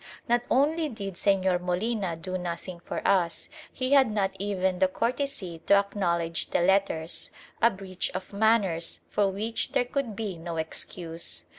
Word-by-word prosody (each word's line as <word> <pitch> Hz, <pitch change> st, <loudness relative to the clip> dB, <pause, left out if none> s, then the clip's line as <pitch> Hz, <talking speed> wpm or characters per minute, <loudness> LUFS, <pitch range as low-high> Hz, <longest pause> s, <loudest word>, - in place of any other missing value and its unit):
Not 240 Hz, 0 st, +3 dB
only 305 Hz, +4 st, +3 dB
did 200 Hz, -5 st, -5 dB
Señor 190 Hz, -1 st, +2 dB
Molina 185 Hz, 0 st, -1 dB
do 185 Hz, +3 st, -5 dB
nothing 175 Hz, 0 st, -4 dB
for -, -, -3 dB
us; 180 Hz, -4 st, +2 dB, 0.2 s
he 255 Hz, 0 st, -2 dB
had 270 Hz, -4 st, +6 dB
not 200 Hz, -2 st, 0 dB
even 190 Hz, -2 st, 0 dB
the 190 Hz, -, +5 dB
courtesy 230 Hz, -, -2 dB
to 200 Hz, -, +7 dB
acknowledge 170 Hz, -5 st, 0 dB
the -, -, +2 dB
letters; 175 Hz, -3 st, +1 dB, 0.3 s
a 230 Hz, -, +7 dB
breach 190 Hz, -3 st, -4 dB
of 185 Hz, +2 st, -5 dB
manners 200 Hz, -6 st, +2 dB
for 205 Hz, -1 st, +3 dB
which 220 Hz, +4 st, -3 dB
there 245 Hz, -, +3 dB
could 245 Hz, -4 st, -2 dB
be 195 Hz, -5 st, -4 dB
no 165 Hz, 0 st, -5 dB
excuse. 165 Hz, +1 st, -5 dB
195 Hz, 155 wpm, -28 LUFS, 175-220 Hz, 0.3 s, to